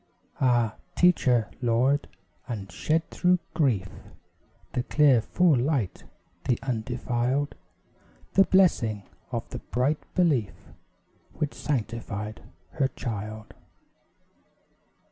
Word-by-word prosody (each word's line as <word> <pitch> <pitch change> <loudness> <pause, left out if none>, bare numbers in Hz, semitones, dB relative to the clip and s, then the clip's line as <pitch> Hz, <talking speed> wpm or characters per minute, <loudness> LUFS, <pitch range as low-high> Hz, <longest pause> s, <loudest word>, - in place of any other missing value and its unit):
Ah, 120 -4 +2 0.2
teach 180 -2 +4
her, 120 -5 +3
Lord! 125 +4 +2 0.4
And 100 -7 -5
shed 155 - 0
through 180 0 +3 0.2
grief 115 - +1 0.9
The 125 - 0
clear 135 -2 +4
full 175 +6 +3
light, 125 - -1 0.4
the 125 -3 +2
undefiled, 125 +2 -1 0.8
The 195 - +6
blessing 115 - +3 0.3
of - - -3
the - - -5
bright 135 +5 0 0.2
belief 145 - +2 0.8
Which 150 -2 -2
sanctified 110 -5 -3 0.3
her 135 - +1
child. 110 -3 -6
125 Hz, 95 wpm, -27 LUFS, 110-145 Hz, 0.9 s, The